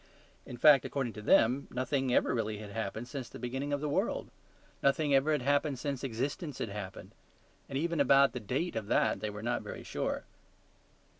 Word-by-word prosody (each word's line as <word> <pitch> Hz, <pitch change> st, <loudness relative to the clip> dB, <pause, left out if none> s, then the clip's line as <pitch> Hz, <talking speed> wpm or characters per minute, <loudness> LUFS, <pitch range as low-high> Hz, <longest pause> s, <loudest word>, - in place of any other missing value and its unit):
In 120 Hz, -, -7 dB
fact, 140 Hz, +2 st, +7 dB
according 130 Hz, -5 st, -2 dB
to 105 Hz, -, -8 dB
them, 125 Hz, +5 st, +4 dB
nothing 130 Hz, +1 st, -1 dB
ever -, -, +3 dB
really 110 Hz, -3 st, -1 dB
had 105 Hz, -1 st, -8 dB
happened 110 Hz, +2 st, -4 dB
since 130 Hz, -4 st, -6 dB
the -, -, -9 dB
beginning 130 Hz, +4 st, -3 dB
of 145 Hz, 0 st, -1 dB
the 150 Hz, -, -1 dB
world. 145 Hz, -, -1 dB, 0.5 s
Nothing 145 Hz, +1 st, +2 dB
ever 135 Hz, +3 st, +4 dB
had 150 Hz, -5 st, +1 dB
happened 145 Hz, +1 st, +1 dB
since 140 Hz, 0 st, -3 dB
existence 135 Hz, +5 st, -3 dB
had 115 Hz, -, -3 dB
happened; 100 Hz, -2 st, -7 dB, 0.6 s
and 135 Hz, -, -2 dB
even 170 Hz, +2 st, -1 dB
about 140 Hz, -2 st, +5 dB
the 125 Hz, -, -3 dB
date 130 Hz, -, -2 dB
of 110 Hz, -2 st, -3 dB
that -, -, +2 dB
they 110 Hz, -, -3 dB
were 105 Hz, +1 st, -7 dB
not 120 Hz, +1 st, 0 dB
very -, -, -8 dB
sure. -, -, -3 dB
130 Hz, 195 wpm, -31 LUFS, 115-140 Hz, 0.6 s, fact